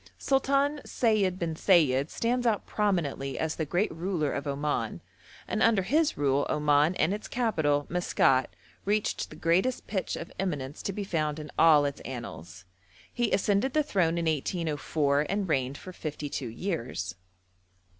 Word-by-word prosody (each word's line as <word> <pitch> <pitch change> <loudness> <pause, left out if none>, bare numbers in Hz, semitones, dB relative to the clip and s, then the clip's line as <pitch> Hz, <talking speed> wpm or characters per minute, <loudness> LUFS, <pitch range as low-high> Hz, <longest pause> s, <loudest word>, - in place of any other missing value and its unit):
Sultan 275 +2 +1
Sayid 210 -6 +1
bin 170 -3 -2
Sayid 155 -5 +3
stands 245 +1 0
out 215 -3 +1
prominently 165 -10 -1
as 160 0 -1
the 160 - -3
great 180 +7 +1
ruler 165 -3 -1
of 140 - -4
Oman, 140 - -2 0.5
and 220 - -2
under 220 -4 +4
his 300 - +1
rule 140 0 +1
Oman 150 +3 +3
and 180 - +1
its 210 - -5
capital, 155 - +1
Maskat, 135 -7 +2 0.4
reached 210 +1 0
the - - -11
greatest 175 +11 +1
pitch 190 -3 -2
of 170 - -7
eminence 145 -7 -3
to - - -2
be 205 +1 -4
found 155 -5 -1
in 150 -1 -8
all 150 -3 +6
its 140 0 -3
annals. 90 -8 -8 0.5
He 240 -2 0
ascended 200 +6 +1
the 305 - +4
throne 175 - +1
in 170 - -1
1804, 150 -2 0
and 200 0 -1
reigned 135 -3 0
for 185 - -10
fifty 150 -3 -5
two 130 -3 -4
years. 120 - -3
165 Hz, 155 wpm, -28 LUFS, 145-200 Hz, 0.5 s, all